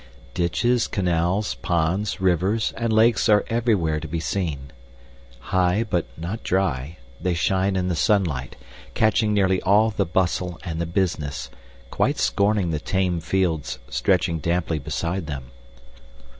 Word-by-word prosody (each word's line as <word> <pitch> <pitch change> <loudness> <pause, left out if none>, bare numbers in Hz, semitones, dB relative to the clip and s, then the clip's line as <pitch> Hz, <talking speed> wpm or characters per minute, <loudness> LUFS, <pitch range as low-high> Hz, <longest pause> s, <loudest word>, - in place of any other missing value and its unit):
Ditches, 115 +8 +1
canals, 90 +1 0
ponds, 90 +6 -1
rivers, 95 +4 +1
and 115 -1 -1
lakes 110 +1 +4
are 105 -1 +5
everywhere 105 -10 +1
to 80 - -6
be 85 +2 -3
seen. 80 -7 -3 0.8
High, 95 +3 +3
but 90 -5 0
not 90 +7 -5
dry, 80 -5 -1 0.2
they 90 -1 0
shine 95 +2 +1
in 90 -1 0
the 90 - 0
sunlight, 80 - 0 0.4
catching 110 0 +2
nearly 95 -2 +2
all 105 +4 +4
the 100 -3 -1
bustle 90 -1 -1
and 85 -2 -4
the 85 - -2
business, 85 -5 -2 0.4
quite - - +1
scorning 100 -3 +1
the 75 - -1
tame 90 +1 0
fields 85 -4 -1
stretching 85 -1 +1
damply 85 0 -1
beside 85 +4 -3
them. 65 -4 -6
90 Hz, 135 wpm, -23 LUFS, 80-100 Hz, 0.8 s, are